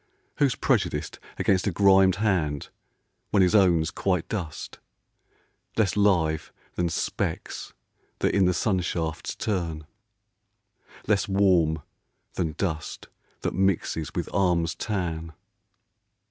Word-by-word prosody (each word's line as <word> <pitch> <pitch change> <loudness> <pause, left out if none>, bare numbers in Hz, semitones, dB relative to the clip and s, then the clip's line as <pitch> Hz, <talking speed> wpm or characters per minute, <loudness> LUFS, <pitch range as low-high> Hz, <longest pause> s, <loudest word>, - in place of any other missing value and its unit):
Who's 140 -4 +3
prejudiced - - 0 0.2
Against 95 +1 +2
a - - +2
grimed 95 0 +5
hand 90 -9 0 0.6
when 100 -2 +4
his 90 - +3
own's 85 -6 +4
quite 90 -4 -1
dust, 90 -8 -5 1.0
Less 110 -3 +2
live 85 -7 +2 0.2
than 85 -1 0
specks - - -3 0.4
that - - +1
in 100 -2 +4
the 90 - +3
sun 95 0 +1
shafts 80 -3 -3
turn, 85 -7 -2 1.2
Less 100 -2 +2
warm 90 -6 +3 0.5
than 80 -4 -2
dust 80 -4 -4 0.3
that - - -2
mixes 90 -5 0
with - - -2
arms' 85 -3 +2
tan 85 -5 -3
90 Hz, 110 wpm, -26 LUFS, 80-100 Hz, 1.2 s, grimed